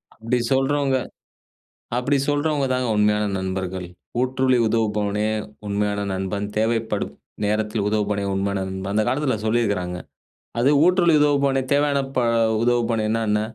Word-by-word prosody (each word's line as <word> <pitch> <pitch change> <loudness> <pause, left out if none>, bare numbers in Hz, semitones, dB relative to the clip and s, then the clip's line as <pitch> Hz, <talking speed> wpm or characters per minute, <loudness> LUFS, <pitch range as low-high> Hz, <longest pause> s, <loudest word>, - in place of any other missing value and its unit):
அப்பிடி 115 +3 -1
சொல்றவங்க 135 0 +2 1.0
அப்பிடி 135 +3 +1
சொல்றவங்க 145 -1 +1
தாங்க 125 -1 0
உண்மையான 105 0 +2
நண்பர்கள். 95 -1 -3 0.4
"ஊற்றுழி 130 0 +2
உதவுபவனே 105 -2 0 0.4
உண்மையான 100 0 -1
நண்பன். 95 +2 -2
தேவைப்படும் 110 -1 -1 0.3
நேரத்தில் 105 0 0
உதவுபவனே! 105 -1 0
உண்மையான 100 0 -1
நண்பன்" 95 +1 -4
அந்த 110 - +3
காலத்தில 135 -2 +1
சொல்லியிருக்கிறாங்க. 100 -6 0 0.6
அது 125 - +4 0.2
ஊற்றுழி 175 -2 +4
உதவுபவனே 140 -2 +2
தேவையானப்ப 140 -1 +1 0.5
உதவுபவனேனா 115 -2 +1
என்ன? 105 0 +2
110 Hz, 110 wpm, -22 LUFS, 100-135 Hz, 1.0 s, அது